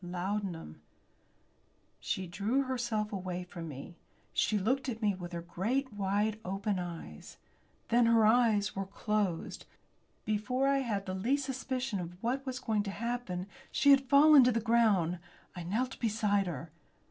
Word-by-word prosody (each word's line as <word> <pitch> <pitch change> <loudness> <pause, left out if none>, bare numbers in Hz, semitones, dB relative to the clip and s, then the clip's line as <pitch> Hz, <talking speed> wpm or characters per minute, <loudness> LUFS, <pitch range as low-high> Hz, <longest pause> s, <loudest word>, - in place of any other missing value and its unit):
"Laudanum!" 180 - -4 1.2
She 190 - -2
drew 205 +10 0
herself 240 -5 -2
away 180 -2 -4
from 170 -2 -8
me. 145 +3 -9 0.4
She 215 - +2
looked 260 +7 0
at 225 -2 -4
me 210 -3 +2
with 175 -2 -7
her 170 -1 -5
great 230 +9 -2
wide 205 +2 0
open 195 +1 -2
eyes. 170 - -8 0.5
Then 235 0 +4
her 230 -1 +5
eyes 220 -2 +3
were 195 -1 -3
closed. 200 -4 -2 0.6
Before 250 +6 0
I 275 0 +3
had 210 -7 -2
the 185 - -4
least 260 +9 0
suspicion 260 -4 -3
of 175 0 -6
what 255 +4 -1
was 260 -1 -3
going 220 -5 0
to 205 - -4
happen 220 -4 -3 0.3
she 285 - +4
had 270 -1 +4
fallen 290 0 +8
to 250 - +4
the 230 - +1
ground. 215 -7 +2 0.4
I 175 - -5
knelt 225 +10 -2
beside 210 -3 +1
her. 165 -1 -6
210 Hz, 155 wpm, -31 LUFS, 185-245 Hz, 1.2 s, fallen